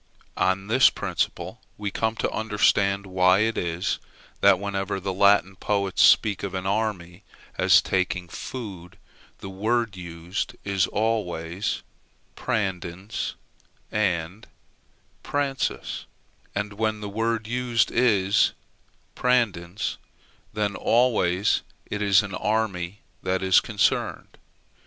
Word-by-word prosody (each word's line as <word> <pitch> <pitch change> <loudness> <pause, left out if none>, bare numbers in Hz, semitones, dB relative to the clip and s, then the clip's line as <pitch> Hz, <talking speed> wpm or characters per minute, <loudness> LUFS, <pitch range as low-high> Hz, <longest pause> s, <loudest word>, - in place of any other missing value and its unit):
On 95 +1 +1
this 120 +5 +5
principle - - -3 0.2
we 105 -1 -3
come 110 +2 -1
to - - -1
understand 100 -2 +2
why 90 +1 +3
it 110 +1 +1
is, 85 +2 -1 0.4
that, 100 -1 +6
whenever 100 0 -2
the 95 0 -3
Latin 100 -1 +4
poets 100 -1 0
speak 105 -3 +5
of 95 -1 -4
an 95 0 -3
army 100 -3 -2 0.4
as - - +6
taking 90 -1 -1
food, 95 -4 -8 0.4
the 95 - -6
word 110 +2 0
used 90 +7 -5
is 100 -2 +1
always 100 -5 -2 0.5
prandens 95 0 -3 0.6
and 95 -1 -1 0.7
pransus; 140 - -2 0.5
and, 100 +1 -2
when 110 0 -1
the 105 - -4
word 115 +2 -1
used 120 -1 +1
is 105 -6 +3 0.6
prandens, 105 -7 0 0.5
then 105 -1 -1
always 105 -6 +2 0.3
it 105 - -2
is 100 0 +5
an 100 -2 -6
army 105 -3 -1 0.2
that 95 0 -1
is 95 -1 +6
concerned. 105 -3 -1
100 Hz, 110 wpm, -25 LUFS, 95-110 Hz, 0.7 s, that